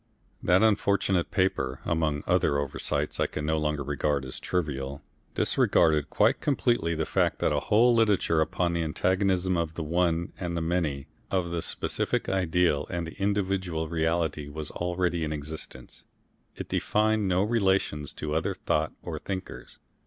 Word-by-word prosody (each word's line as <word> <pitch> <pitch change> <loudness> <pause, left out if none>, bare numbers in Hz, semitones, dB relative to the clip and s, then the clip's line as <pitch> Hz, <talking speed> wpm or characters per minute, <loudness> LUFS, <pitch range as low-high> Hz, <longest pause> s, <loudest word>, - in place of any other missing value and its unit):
That 90 +4 +4
unfortunate 100 -4 +2
paper, 95 -8 0
among 80 -3 0
other 70 - +2
oversights 70 -2 -2
I - - +2
can 75 - -5
no 80 0 +1
longer 75 -1 -1
regard 70 0 -1
as 65 - -7
trivial, 70 -5 -3 0.3
disregarded 75 -3 +3
quite - - +2
completely 120 - +1
the 80 0 -1
fact - - +1
that - - +1
a - - +2
whole 120 +4 +4
literature 105 -8 +3
upon 85 +2 0
the 85 - 0
antagonism 95 +3 +1
of 80 -1 -2
the 85 - -3
one 85 +1 0
and 85 -2 -3
the - - -1
many, 80 -5 -1 0.2
of 90 -3 -1
the 85 -1 -1
specific - - -2
ideal 90 -5 +1
and 85 -2 -3
the 80 - -9
individual 95 -5 0
reality, 80 -2 0
was 75 0 -6
already 90 -1 -1
in 75 - -2
existence. 75 +1 -7 0.5
It - - -6
defined 110 -1 +1
no 90 +1 +2
relations 95 -9 +1
to 75 0 -4
other 80 +1 0
thought 75 +1 -1
or - - -5
thinkers. 95 -1 -6
85 Hz, 155 wpm, -27 LUFS, 75-95 Hz, 0.5 s, That